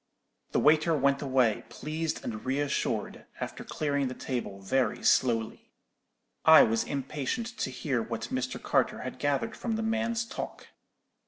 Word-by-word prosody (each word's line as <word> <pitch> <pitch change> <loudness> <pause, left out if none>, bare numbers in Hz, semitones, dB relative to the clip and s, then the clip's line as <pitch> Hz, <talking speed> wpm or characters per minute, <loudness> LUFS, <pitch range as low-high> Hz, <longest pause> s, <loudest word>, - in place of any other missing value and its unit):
"The - - +2
waiter 155 +2 +4
went 140 0 +2
away, 130 -6 +2
pleased 155 +1 -3
and 110 -2 -4
re 135 +2 0
assured, 145 -1 -2
after - - -5
clearing 140 -3 -1
the 130 - -5
table 120 -6 -4
very 125 +7 0
slowly. 115 -3 +2 0.7
I 160 0 +9
was 110 0 +2
impatient 140 - -3
to - - -1
hear 130 -1 -1
what 115 0 -4
Mr. 130 -1 -2
Carter - - +1
had - - -6
gathered 145 +9 0
from 230 -2 -2
the 225 - -2
man's 225 +1 0
talk. - - -7
140 Hz, 150 wpm, -29 LUFS, 125-155 Hz, 0.7 s, I